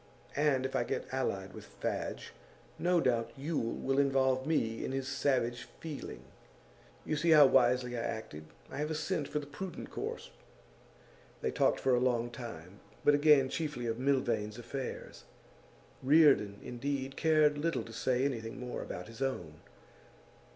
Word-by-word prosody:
And 140 Hz, -3 st, +2 dB
if 135 Hz, -, -3 dB
I -, -, +2 dB
get -, -, -3 dB
allied 95 Hz, -7 st, -2 dB
with -, -, -10 dB
Fadge, -, -, -3 dB, 0.5 s
no 175 Hz, 0 st, +3 dB
doubt 120 Hz, -6 st, +1 dB
Yule 140 Hz, -4 st, -2 dB
will 135 Hz, +1 st, 0 dB
involve 135 Hz, -1 st, +2 dB
me 115 Hz, -8 st, 0 dB
in -, -, -3 dB
his 135 Hz, -1 st, -2 dB
savage 130 Hz, -4 st, 0 dB
feeling. 155 Hz, -3 st, -7 dB, 0.8 s
You 155 Hz, -, -1 dB
see 160 Hz, +3 st, +1 dB
how 155 Hz, -2 st, +9 dB
wisely 125 Hz, -1 st, +3 dB
I -, -, -2 dB
acted. 110 Hz, -10 st, -5 dB, 0.3 s
I 135 Hz, -, -6 dB
have 150 Hz, +1 st, -1 dB
a 160 Hz, -, -2 dB
scent 155 Hz, -1 st, -1 dB
for 150 Hz, -, -3 dB
the 150 Hz, -, -3 dB
prudent 185 Hz, +5 st, -7 dB
course.' -, -, -5 dB, 1.1 s
They -, -, 0 dB
talked -, -, +2 dB
for 130 Hz, -, +2 dB
a 125 Hz, -, +4 dB
long 120 Hz, -1 st, +1 dB
time, 100 Hz, -6 st, -9 dB, 0.3 s
but 145 Hz, -, +6 dB
again 145 Hz, -2 st, +5 dB
chiefly 145 Hz, -4 st, -3 dB
of 115 Hz, 0 st, -2 dB
Milvain's 120 Hz, -6 st, 0 dB
affairs. 125 Hz, +3 st, -6 dB, 0.8 s
Reardon, 135 Hz, -8 st, +5 dB
indeed, 135 Hz, +2 st, -3 dB
cared 155 Hz, -2 st, +3 dB
little 165 Hz, -3 st, 0 dB
to 115 Hz, -, -11 dB
say 125 Hz, +3 st, +1 dB
anything 115 Hz, -5 st, -3 dB
more 125 Hz, 0 st, -5 dB
about -, -, -6 dB
his 115 Hz, +3 st, -11 dB
own. 90 Hz, -, -3 dB
130 Hz, 160 wpm, -32 LUFS, 120-145 Hz, 1.1 s, how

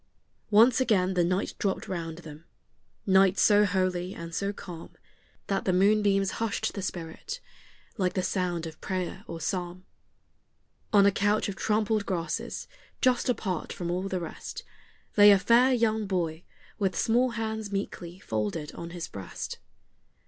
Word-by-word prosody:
Once 230 Hz, +4 st, +6 dB
again 190 Hz, -7 st, +2 dB
the 180 Hz, -1 st, +2 dB
night 185 Hz, +3 st, 0 dB
dropped 195 Hz, -2 st, -1 dB
round 165 Hz, -3 st, -4 dB
them, 160 Hz, -2 st, -11 dB, 0.6 s
night 190 Hz, 0 st, +5 dB
so 210 Hz, 0 st, +5 dB
holy 185 Hz, -1 st, -1 dB
and 170 Hz, 0 st, -8 dB
so 200 Hz, +3 st, -1 dB
calm 175 Hz, -5 st, -9 dB, 0.6 s
That 195 Hz, -1 st, -1 dB
the 185 Hz, -, +3 dB
moonbeams 195 Hz, 0 st, +3 dB
hushed 225 Hz, -3 st, -1 dB
the 200 Hz, -, -4 dB
spirit, 185 Hz, -, -5 dB, 0.6 s
like 185 Hz, -3 st, +1 dB
the 185 Hz, -, -1 dB
sound 175 Hz, -4 st, -1 dB
of 160 Hz, -1 st, -9 dB
prayer 185 Hz, +1 st, -3 dB
or 165 Hz, -, -6 dB
psalm. 180 Hz, +1 st, -3 dB, 1.1 s
On 200 Hz, -2 st, +6 dB
a 200 Hz, -, +6 dB
couch 205 Hz, +2 st, +1 dB
of 195 Hz, -, -4 dB
trampled 215 Hz, 0 st, 0 dB
grasses, 170 Hz, -4 st, -3 dB, 0.3 s
just 255 Hz, 0 st, +2 dB
apart 195 Hz, -7 st, -2 dB
from 175 Hz, -1 st, -4 dB
all 185 Hz, +2 st, -1 dB
the 190 Hz, -1 st, -2 dB
rest, 165 Hz, -2 st, -7 dB, 0.5 s
Lay 205 Hz, 0 st, +9 dB
a 200 Hz, -, +8 dB
fair 235 Hz, +6 st, +4 dB
young 220 Hz, -3 st, +1 dB
boy, 170 Hz, -3 st, -2 dB, 0.3 s
with 195 Hz, -2 st, 0 dB
small 245 Hz, +3 st, +3 dB
hands 220 Hz, -2 st, -3 dB
meekly 185 Hz, -3 st, -4 dB
folded 115 Hz, -, -3 dB
on 170 Hz, -, -7 dB
his 170 Hz, -1 st, -6 dB
breast. 95 Hz, -2 st, -7 dB
190 Hz, 150 wpm, -28 LUFS, 175-210 Hz, 1.1 s, Lay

